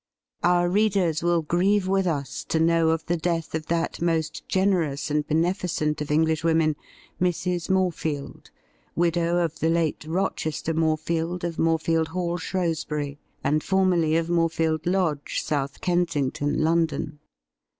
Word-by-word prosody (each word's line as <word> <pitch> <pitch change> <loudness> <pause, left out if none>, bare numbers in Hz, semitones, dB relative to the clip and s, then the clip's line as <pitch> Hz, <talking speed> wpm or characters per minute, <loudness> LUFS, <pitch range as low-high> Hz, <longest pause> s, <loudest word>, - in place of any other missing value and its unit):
' - - -67
Our 175 0 +3
readers 190 -5 +2
will 170 -1 +2
grieve 185 +5 +2
with 195 0 +1
us 140 -6 -2
to 160 - 0
know 165 0 +3
of 160 0 0
the 175 - 0
death 165 -1 -2
of 155 -1 -3
that 165 0 -1
most 165 -2 -1
generous 175 -7 +1
and 150 0 0
beneficent 160 -2 0
of 150 - -4
Englishwomen, 160 0 +2 0.5
Mrs. 180 -1 0
Morefield, 170 -6 -1 0.5
widow 170 0 +1
of 165 -2 -1
the 160 - +1
late 165 -2 0
Rochester 160 -2 -1
Morefield, 165 +2 -1
of 170 -2 -3
Morefield 165 0 +2
Hall, 175 +1 -2
Shrewsbury, 155 -5 -2 0.2
and 150 +2 +1
formerly 180 -5 +2
of 165 - 0
Morefield 165 -2 0
Lodge, 175 -6 0
South 140 -2 -2
Kensington, 160 -5 0
London. 160 -2 0
165 Hz, 135 wpm, -25 LUFS, 155-175 Hz, 0.5 s, Our